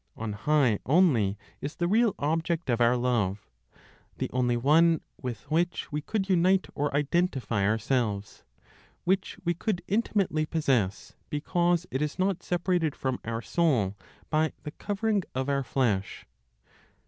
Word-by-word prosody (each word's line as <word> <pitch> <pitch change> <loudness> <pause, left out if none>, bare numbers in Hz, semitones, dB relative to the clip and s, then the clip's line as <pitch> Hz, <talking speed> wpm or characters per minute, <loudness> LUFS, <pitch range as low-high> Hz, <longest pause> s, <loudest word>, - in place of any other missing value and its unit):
On 110 -2 -4
high 125 -1 +2
only 130 - +3 0.2
is 145 +3 -5
the 175 - 0
real 220 +2 +3
object 165 0 -1
of 120 0 0
our 120 +1 +4
love; 110 -6 0 0.7
the - - -3
only 125 -1 +1
one 160 +6 +4 0.2
with 120 -5 -4
which 175 +1 0
we 150 +1 -2
could 195 +4 -2
unite 185 0 +3
or 145 +1 -1
identify 140 - 0
ourselves, 110 -2 -1 0.6
which 190 +2 0
we 170 - +2
could 180 +1 -2
intimately 195 -7 0
possess, 130 - 0 0.2
because 175 +3 +1
it 130 - -1
is 150 -1 -2
not 185 -1 0
separated 175 -3 0
from 130 -1 -2
our 115 0 -4
soul 125 - +1 0.4
by 155 0 +2
the 150 - -5
covering 205 +4 -1
of 130 +1 -1
our 140 -1 +1
flesh. 115 -7 -1
150 Hz, 140 wpm, -28 LUFS, 120-175 Hz, 0.7 s, our